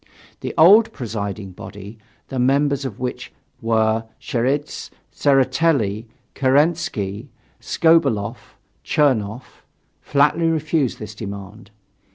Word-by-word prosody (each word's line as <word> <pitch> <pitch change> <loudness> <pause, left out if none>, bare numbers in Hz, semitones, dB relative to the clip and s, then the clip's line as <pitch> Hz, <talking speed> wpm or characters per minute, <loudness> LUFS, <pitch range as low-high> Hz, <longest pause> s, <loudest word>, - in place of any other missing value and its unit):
The - - -5
old 200 +8 +7
presiding 100 -5 -5
body, 100 +4 -10 0.3
the 130 - -3
members 140 +2 +2
of 115 -7 -6
which 125 0 -5 0.3
were 110 0 +1
Cheidze, 135 +5 -2 0.2
Tseretelli, 130 -6 +2 0.3
Kerensky, 135 - 0 0.3
Skobeloff, 140 -11 +1 0.3
Chernoff, 125 -5 0 0.4
flatly 145 +4 +2
refused 155 -4 0
this 105 -1 -8
demand. 100 +1 -8
125 Hz, 90 wpm, -21 LUFS, 105-145 Hz, 0.4 s, old